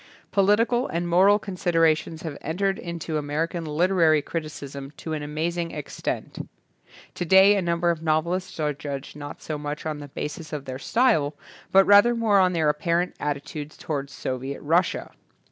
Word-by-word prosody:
Political 225 +6 +3
and 170 +1 -2
moral 190 +4 +5
considerations 165 -5 0
have 160 -4 -5
entered 195 +5 -1
into 165 -2 -4
American 160 +3 -2
literary 160 -1 +3
criticism 140 -4 -6
to 160 - -5
an 155 - -3
amazing 165 +3 -2
extent. 150 -3 -5 0.6
To - - -3
day 190 +4 +6
a 200 - +1
number 170 0 +1
of 165 -2 -4
novelists 165 +3 -1
are 150 -1 0
judged 140 -1 -6
not 145 -1 -8
so 155 -2 -4
much 150 +1 -5
on 155 -2 -3
the 145 - -8
basis 150 +3 -6
of 145 -2 -4
their 130 0 -6
style 160 - +2 0.4
but 195 0 +6
rather 205 +4 +6
more 220 -4 +3
on 185 -1 +3
their 160 -3 +1
apparent 170 +4 0
atti 145 -1 -2
tude 145 +1 -7
toward 140 -3 -4
Soviet 135 0 -4
Russia. 165 +4 +1
165 Hz, 160 wpm, -25 LUFS, 150-180 Hz, 0.6 s, day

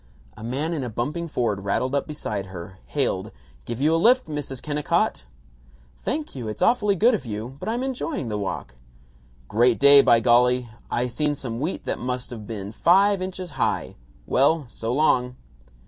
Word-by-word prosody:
A - - -11
man 140 +8 -2
in 150 -5 -2
a 125 - -3
bumping 150 +10 -3
Ford 115 -9 -1
rattled 125 +7 -1
up 140 - 0
beside 105 -10 -4
her, 95 0 -9
hailed, - - -1 0.4
"Give 120 0 -5
you 150 +4 +3
a 165 - +2
lift, 250 +5 +5
Mrs. 145 -4 -5
Kennicott?" 150 - -1 0.7
"Thank 300 +1 -3
you. 125 -5 -6
It's 105 -1 -3
awfully 210 -4 +3
good 230 +7 +4
of 220 - -1
you, 115 +2 -6
but - - -4
I'm 240 +3 -1
enjoying 265 - -3
the 105 -2 -2
walk." 65 -10 -5 0.7
"Great 120 - +3
day, 140 0 +9
by 120 -3 +5
golly. 125 +1 +3 0.2
I 120 - 0
seen 145 +4 -1
some 120 -4 -5
wheat 155 +7 -3
that - - -2
must 125 0 -4
of 110 -4 -8
been 105 -3 -5
five 195 - +4
inches 185 -2 -5
high. 135 - -1 0.3
Well, 145 - +3
so 115 -1 -4
long." 125 -3 +2
130 Hz, 180 wpm, -24 LUFS, 115-165 Hz, 0.7 s, day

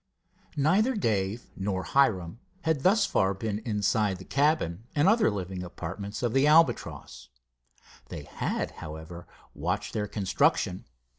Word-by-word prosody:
Neither 195 - +3
Dave 110 - -1
nor 95 -1 -2
Hiram 110 -8 +1 0.2
had 160 -4 0
thus 200 +5 +4
far 95 - +1
been 105 +1 -3
inside 105 -2 0
the 95 - -11
cabin 140 - +1
and 145 +4 +3
other 220 +2 +4
living 95 -3 -4
apartments 90 +5 -6
of 120 -2 0
the 135 +2 +4
Albatross. 165 +2 +2 0.8
They - - -7
had, - - -3
however, 80 +3 -8 0.3
watched - - -3
their 105 -1 -1
construction. 95 -2 0
105 Hz, 130 wpm, -28 LUFS, 95-145 Hz, 0.8 s, thus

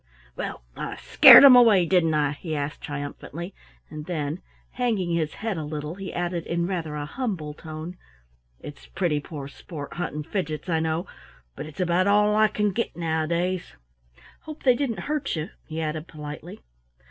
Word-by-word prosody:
"Well, - - -5
I - - -5
scared - - +9
'em 270 -2 +10
away, 220 -7 +6
didn't 165 -3 +2
I?" 145 -1 +2
he 155 +2 -5
asked 145 0 -4
triumphantly, 145 +5 -6 0.3
and 155 -1 -9
then, 155 -1 -3 0.3
hanging 220 -9 -1
his 160 -2 -1
head 220 -4 -3
a 160 - -3
little, 150 +1 -5
he 195 +1 -7
added 175 -1 -3
in 170 0 -1
rather 170 -5 -3
a 145 -1 -4
humble 180 - -4
tone, 155 +3 -8 0.6
"It's 145 - -11
pretty 165 -6 -1
poor 145 -2 -8
sport 145 +1 -9
hunting 150 -3 -4
Fidgets, 160 -1 -4
I 165 -2 +1
know, 160 +2 -1 0.5
but - - -6
it's 155 - -13
about 180 +1 +2
all 210 +1 +4
I 215 0 +5
can 210 -1 0
get 225 -4 -3
nowadays. 170 +2 -1 0.6
Hope 310 -1 -10
they 255 - +6
didn't 245 -3 -2
hurt 300 -8 -2
you?" 160 +4 -4 0.2
he 160 0 -5
added 155 0 -3
politely. 150 - -9
170 Hz, 170 wpm, -25 LUFS, 150-195 Hz, 0.6 s, em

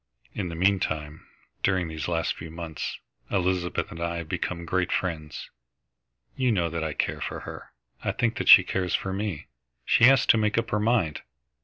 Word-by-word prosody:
In 95 -4 -3
the 85 - -6
meantime, 80 -5 0 0.3
during 95 -3 +1
these 80 -1 -5
last 85 -1 0
few 80 - -9
months, 80 -1 -5 0.3
Elizabeth 90 -2 -1
and 85 - -8
I 85 0 -1
have 85 -2 -5
become 85 +1 -3
great 90 +1 0
friends. 80 -5 -3 0.8
You 130 -2 +1
know 85 -6 0
that 85 -1 -2
I 80 -1 -2
care - - -2
for - - -4
her. - - -9 0.3
I - - 0
think 115 -1 -1
that - - -1
she 95 - +11
cares 90 -1 -1
for 95 - -2
me. 100 -5 -3 0.4
She 115 - +5
has 135 0 +6
to 115 - +5
make 105 +1 +1
up 115 0 0
her 105 - +1
mind. 105 -8 +1
90 Hz, 185 wpm, -26 LUFS, 80-100 Hz, 0.8 s, she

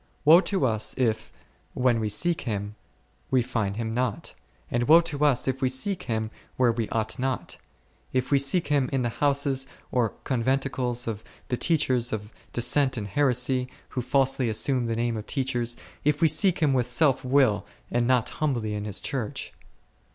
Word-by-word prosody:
Woe 165 +4 +8
to 195 -7 0
us 110 -3 0
if, 110 -4 -1 0.4
when 125 -2 +2
we 110 -1 -1
seek 160 +11 +2
Him, 105 -3 -4 0.6
we 130 -2 +2
find 110 -5 -2
Him 110 0 -3
not! 125 -3 -2 0.4
and 120 0 0
woe 160 +3 +8
to 150 -3 -3
us 135 -4 +3
if 130 +1 -1
we 130 - +2
seek 180 +9 -1
Him 110 -1 -1 0.3
where 125 -2 +4
we 115 -2 -3
ought 110 +3 -2
not; 130 0 -3 0.5
if 130 +1 -1
we 140 - +5
seek 140 +5 +1
Him 140 -3 +2
in 135 -2 0
the 120 - 0
houses 140 -2 +2 0.2
or 120 -4 0
conventicles 130 -1 -1
of 110 -2 -4 0.3
the 125 - -1
teachers 130 -7 +2
of 105 0 -5 0.2
dissent 130 +2 +3
and 100 -2 -4
heresy, 125 +1 +1 0.2
who 125 - -3
falsely 130 -1 +1
assume 120 +3 0
the 115 - -1
name 115 0 -1
of 105 - -7
teachers; 120 -4 -1 0.3
if 150 0 +1
we 165 - +5
seek 165 +2 +2
Him 145 -3 +3
with 125 -2 +1
self 135 +1 +2
will 125 -6 +2 0.3
and 120 0 +1
not 125 -3 +2
humbly 120 -8 0
in 105 0 -4
His 105 -3 -3
Church. 130 -7 -4
125 Hz, 180 wpm, -26 LUFS, 115-140 Hz, 0.6 s, Woe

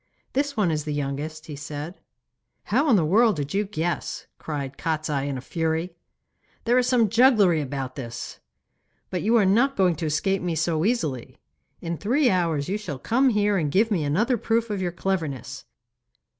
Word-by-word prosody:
'This 280 -1 -1
one 195 -6 +2
is 150 -1 -1
the 150 -1 -3
youngest,' 145 +3 -4
he 150 - -7
said. 150 +4 -7 0.6
'How 310 - +1
in 235 - +6
the 170 -6 +3
world 215 +5 +4
did 145 -2 -4
you 205 +2 +1
guess?' 175 -3 -3
cried 140 -3 -5
Kostiei 155 -3 -2
in 135 - -3
a - - -6
fury. 165 +4 -2 0.7
'There 240 +2 +4
is 250 - +1
some 245 -3 +3
jugglery 215 - +4
about 135 -1 -5
it! 120 -2 -7 0.7
But 180 - -2
you 225 +4 +2
are 210 - +4
not 240 +9 +3
going 185 -3 +3
to 160 -1 -2
escape 190 +6 0
me 175 -2 -2
so 160 +1 0
easily. 160 - -1 0.4
In 170 0 -3
three 250 +5 +2
hours 165 -6 0
you 200 +3 -2
shall 175 -10 -5
come 260 - +2
here 210 -3 +2
and 150 -3 -1
give 220 +7 +3
me 175 -7 +1
another 215 - +1
proof 225 +1 0
of 200 -2 -2
your 175 -1 -1
cleverness. 165 - -3
175 Hz, 185 wpm, -25 LUFS, 150-215 Hz, 0.7 s, in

